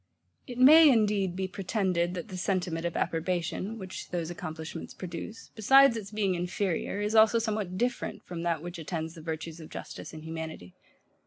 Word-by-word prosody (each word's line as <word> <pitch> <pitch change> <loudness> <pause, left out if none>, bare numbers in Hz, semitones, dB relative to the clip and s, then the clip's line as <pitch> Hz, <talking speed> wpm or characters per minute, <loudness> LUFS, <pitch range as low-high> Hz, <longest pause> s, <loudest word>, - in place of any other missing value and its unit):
It 245 -2 -7
may, 305 +5 +9
indeed, 205 -6 +2
be 190 0 -2
pretended, 185 -2 -1
that 175 - -6
the 190 - -6
sentiment 180 -3 -1
of 170 - -4
approbation, 180 +5 -1
which 190 -3 -7
those 170 -2 -3
accomplishments 160 -1 -7
produce, 185 +5 -7
besides 270 +3 +6
its 210 -3 -5
being 210 -3 0
INFERIOR, 180 +2 -2
is 210 +1 -1
also 220 +1 +6
somewhat 215 -5 -2
DIFFERENT 245 +3 -2
from 175 -2 -6
that 170 -2 -1
which 175 0 -6
attends 160 0 -4
the 165 - -11
virtues 160 +1 -5
of 160 - -10
justice - - -8
and 155 -1 -9
humanity. 160 - -7
185 Hz, 170 wpm, -29 LUFS, 165-215 Hz, -, may